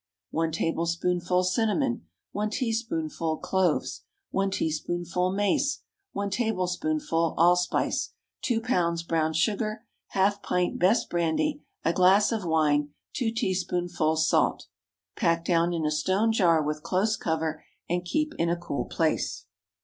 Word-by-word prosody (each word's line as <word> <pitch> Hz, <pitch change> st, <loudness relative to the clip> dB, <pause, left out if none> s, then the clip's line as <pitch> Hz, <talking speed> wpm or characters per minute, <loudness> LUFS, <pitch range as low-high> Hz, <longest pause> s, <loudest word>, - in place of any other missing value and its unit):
1 165 Hz, 0 st, 0 dB
tablespoonful 170 Hz, +2 st, 0 dB
cinnamon. 230 Hz, +5 st, 0 dB, 0.2 s
1 210 Hz, +1 st, -1 dB
teaspoonful 170 Hz, -, -2 dB
cloves. 185 Hz, -4 st, 0 dB, 0.3 s
1 195 Hz, 0 st, +1 dB
teaspoonful 175 Hz, +1 st, -1 dB
mace. 200 Hz, +1 st, 0 dB, 0.3 s
1 200 Hz, 0 st, -2 dB
tablespoonful 220 Hz, -, 0 dB
allspice. 175 Hz, +2 st, +2 dB, 0.3 s
2 235 Hz, -4 st, 0 dB
lbs. 170 Hz, -7 st, 0 dB
brown 160 Hz, -1 st, +1 dB
sugar. 215 Hz, +7 st, -1 dB, 0.2 s
Half 200 Hz, +1 st, +1 dB
pint 180 Hz, 0 st, -1 dB
best 190 Hz, +7 st, +3 dB
brandy. 175 Hz, -, 0 dB, 0.2 s
A 165 Hz, -, +3 dB
glass 190 Hz, +5 st, +5 dB
of 220 Hz, -3 st, -1 dB
wine. 150 Hz, -3 st, +2 dB, 0.2 s
2 240 Hz, -4 st, 0 dB
teaspoonfuls 175 Hz, -6 st, 0 dB
salt. -, -, +2 dB, 0.5 s
Pack 170 Hz, 0 st, +1 dB
down 170 Hz, -1 st, +2 dB
in 165 Hz, -2 st, -1 dB
a 150 Hz, -, +1 dB
stone 190 Hz, +9 st, +1 dB
jar, 170 Hz, -7 st, +3 dB
with 150 Hz, +1 st, -2 dB
close 195 Hz, +6 st, +1 dB
cover, 160 Hz, -3 st, -2 dB, 0.2 s
and 175 Hz, +1 st, -1 dB
keep 305 Hz, -, -1 dB
in 170 Hz, -, +2 dB
a 170 Hz, -, +1 dB
cool 145 Hz, -7 st, -3 dB
place. -, -, -1 dB
180 Hz, 125 wpm, -27 LUFS, 165-205 Hz, 0.5 s, glass